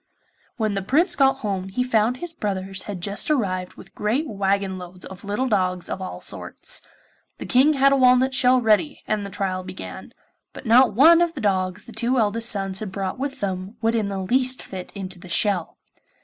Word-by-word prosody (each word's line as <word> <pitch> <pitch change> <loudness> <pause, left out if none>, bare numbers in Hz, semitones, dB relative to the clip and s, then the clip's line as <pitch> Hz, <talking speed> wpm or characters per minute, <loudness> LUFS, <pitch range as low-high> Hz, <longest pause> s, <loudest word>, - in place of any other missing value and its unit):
When 215 -3 0
the 195 - -2
Prince 315 - +2
got 270 -1 +3
home 190 -2 -2
he 250 +6 -1
found 235 0 +1
his 345 +3 -5
brothers 195 - -3
had 190 -4 -5
just 200 - -2
arrived 185 -10 -1
with - - -14
great 245 +9 -1
waggon 195 -3 -1
loads 180 0 -11
of 190 -1 -10
little 210 +6 -1
dogs 185 -5 0
of 190 - -4
all 185 - -6
sorts. - - -2 0.6
The - - -7
King 270 +4 +4
had 275 -1 +4
a - - +4
walnut 255 0 +4
shell 255 0 +4
ready, 225 +6 +1
and 215 -1 -1
the 200 - -6
trial 185 -2 -3
began; 185 0 -9 0.4
but - - -11
not 235 -1 +5
one 330 +7 +7
of 340 -1 +1
the - - -5
dogs 185 -2 -1
the - - -12
two 235 +4 0
eldest 230 +1 +1
sons 195 -2 -1
had 215 -3 -5
brought 190 +2 -4
with 275 0 -4
them 190 +2 -4
would 225 +1 +2
in 220 -3 0
the 200 -1 -4
least 255 +7 +1
fit 185 -2 -8
into 190 -2 -6
the 180 - -12
shell. 180 -1 0
210 Hz, 205 wpm, -23 LUFS, 190-255 Hz, 0.6 s, one